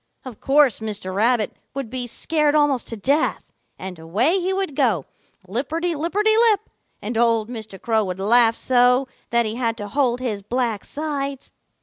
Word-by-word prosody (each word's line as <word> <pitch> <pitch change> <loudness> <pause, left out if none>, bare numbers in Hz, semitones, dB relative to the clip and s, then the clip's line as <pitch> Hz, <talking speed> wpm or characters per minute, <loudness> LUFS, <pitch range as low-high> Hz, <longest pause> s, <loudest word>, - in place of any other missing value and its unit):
Of 250 -5 -9
course 280 -2 +4
Mr. 210 -4 -5
Rabbit 220 +2 +1 0.2
would 270 -5 -5
be 255 -1 -2
scared 300 +4 0
almost 290 -4 +2
to 230 - -5
death, 280 +9 0 0.3
and 185 -3 -7
away 225 - +1
he 370 +1 -1
would 380 -6 -2
go, 225 - +1 0.4
lipperty 310 - -2
lipperty 395 +8 +1
lip, 420 -2 +2 0.4
and 225 +3 -4
old 230 -2 +2
Mr. 220 -5 -8
Crow 220 -2 +1
would 185 -1 -4
laugh 230 +3 +4
so 250 +1 +3 0.2
that 235 0 +2
he 220 +2 -4
had 230 -2 -1
to 205 -2 -6
hold 245 +1 0
his 225 -6 -3
black 230 -1 -2
sides. 280 -3 -4
245 Hz, 165 wpm, -22 LUFS, 220-290 Hz, 0.4 s, course